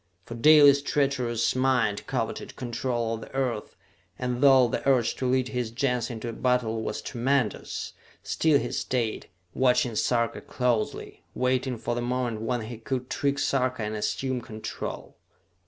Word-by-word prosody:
For - - -8
Dalis' 145 +2 +7
treacherous 130 -6 0
mind 125 -5 +1
coveted - - -3
control 120 -1 -2
of 115 - -5
the - - -11
Earth, 125 -5 -2 0.4
and 125 0 -2
though 135 -3 +7
the - - -2
urge 125 -4 +3
to 130 - -1
lead 130 0 +1
his 125 -3 -2
Gens 125 0 -1
into 115 -1 -5
battle 125 -3 0
was - - -4
tremendous, 125 -2 -1 0.3
still 155 -3 +2
he 120 - -3
stayed, 120 -4 -2 0.2
watching 125 -2 +2
Sarka 115 +1 0
closely, 120 -4 -2
waiting 130 0 0
for 120 +2 -3
the 120 - -2
moment 120 -2 -2
when 120 +1 -1
he 110 +1 -7
could 125 +2 -4
trick 140 0 0
Sarka 130 -4 0
and 105 +1 -3
assume 130 +4 -2
control. 110 -2 -7
125 Hz, 150 wpm, -27 LUFS, 115-130 Hz, 0.4 s, Dalis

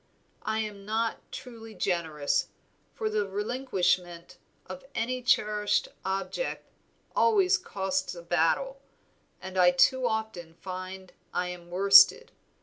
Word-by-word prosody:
I 220 0 -2
am 210 -2 -6
not 220 +2 -3
truly 225 -3 -10
generous, 160 -6 -1 0.5
for 220 - -2
the 210 -1 -1
relinquishment 185 -6 -1 0.3
of - - -9
any 250 +2 -1
cherished 210 -4 +1
object 195 - -3 0.5
always 395 -4 +4
costs 190 -1 -3
a 170 - -10
battle, 175 +12 0 0.6
and 190 0 -5
I 180 -1 +7
too 240 +9 +3
often 220 -7 -4
find 185 +1 -8 0.2
I 180 0 0
am 175 -1 -9
worsted. 200 - +6
195 Hz, 115 wpm, -28 LUFS, 180-225 Hz, 0.6 s, I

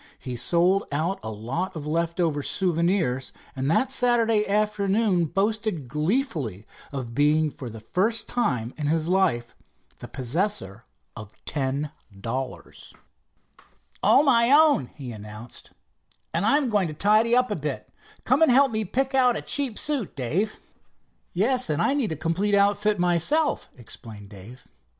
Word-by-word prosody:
He 125 -3 -6
sold 175 - +2
out 160 +7 -1
a 110 - -6
lot 130 - -4
of 150 -2 -6
leftover 165 -1 -1
souvenirs, 170 -6 0 0.2
and 135 +1 -2
that 255 +11 +2
Saturday 230 -4 +2
afternoon 205 -2 +1
boasted 200 - -1
gleefully 150 - -2 0.3
of 130 -4 -5
being 150 +3 +2
for 130 -3 -8
the 110 0 -9
first 205 - -1
time 125 - -1
in 150 - -1
his 160 +1 0
life 175 -11 +1 0.4
the - - -8
possessor 125 - -2 0.3
of 110 -2 -10
ten 140 +1 -2 0.3
dollars. 125 +5 -6 1.1
"All 285 - +5
my 235 -4 +5
own," 295 - +5
he 130 -3 -9
announced, 105 +2 -9 0.6
"and 170 +5 0
I'm 280 +1 +3
going 205 -5 +1
to 155 - -7
tidy 215 +6 +3
up 250 -2 +2
a - - 0
bit. 150 -1 -5 0.4
Come - - +2
and 320 - +6
help 270 +1 +5
me 220 0 -1
pick 265 +7 -1
out 250 -2 +4
a - - -4
cheap 270 -6 0
suit, 285 - -2
Dave." 165 - -2 0.7
"Yes, 250 +5 +1
and 155 0 0
I 175 - +2
need 270 - 0
a - - -1
complete 175 +7 0
outfit 205 +1 +2
myself," 180 - +1
explained 110 -3 -10
Dave. 105 +5 -13
175 Hz, 145 wpm, -25 LUFS, 135-220 Hz, 1.1 s, and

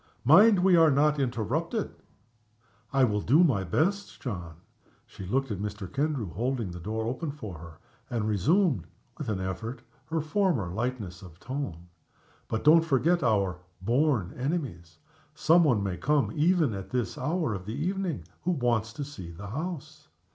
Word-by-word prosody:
"Mind 190 - +7
we 190 -1 +6
are 165 -2 +6
not 150 +1 +3
interrupted!" 135 - -1 1.0
"I 135 -1 +3
will 105 -4 +2
do 150 - +5
my 120 - +2
best, 185 - -1
John." 85 -10 -5 0.5
She 95 - -10
looked 135 +4 0
at 100 - -3
Mr. 105 -1 -4
Kendrew, 140 - -1
holding 120 0 -2
the 85 - -7
door 110 +5 -3
open 130 +7 -3
for 110 - -7
her; 85 -1 -11 0.3
and 115 -3 -1
resumed, 110 - +2 0.3
with - - -4
an 100 -3 -1
effort, 95 +7 -5 0.2
her 160 +3 -1
former 155 - 0
lightness 110 -2 -4
of 85 -3 -13
tone. 125 - -5 0.6
"But 110 - -2
don't 160 +3 +7
forget 165 +3 +2
our 100 -8 +1 0.2
'born 120 - +1
enemies!' 125 - -4 0.4
Somebody 155 -9 +4
may 95 -3 -2
come, 150 -1 +1
even 160 -4 +2
at 95 -1 -6
this 120 -4 -2
hour 155 -1 -1
of 95 -1 -6
the 110 - -4
evening, 175 - -2 0.2
who 180 +3 0
wants 120 -6 0
to 145 - -5
see 110 -12 -8
the 90 +5 -9
house." 155 - -6
125 Hz, 160 wpm, -28 LUFS, 100-155 Hz, 1.0 s, Mind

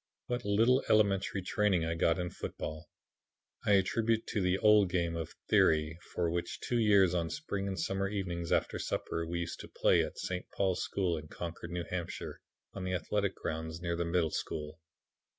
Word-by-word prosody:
"What 125 0 -2
little 115 +6 +4
elementary 100 -2 +3
training 95 -4 +2
I 80 - 0
got 80 0 +2
in 90 -1 -2
football, 80 +2 -6 0.8
I 105 - +5
attribute 110 +3 +2
to 105 - 0
the 90 0 +2
old 105 -2 +5
game 85 -2 0
of 80 -2 -5
'theory,' 80 +1 +3 0.2
which 85 0 0
for - - -8
two 120 - +1
years 100 -5 +5
on 85 -2 0
spring 100 -10 -3
and 95 -1 -3
summer 95 0 0
evenings, 90 -4 -3
after - - +1
supper, 80 0 -2
we 85 +1 -2
used 85 - -5
to - - -8
play - - +3
at - - -6
St. 90 0 -4
Paul's 95 -2 0
School 90 -4 0
in 75 0 -8
Concord, 85 +1 -6
N. 85 - -2
H., 90 -2 -3 0.5
on 95 - -5
the 90 0 -1
athletic 100 +3 -1
grounds 80 0 -4
near 85 0 -2
the 85 - 0
Middle 85 -2 +1
School. 75 +1 -4
90 Hz, 185 wpm, -32 LUFS, 85-100 Hz, 0.8 s, I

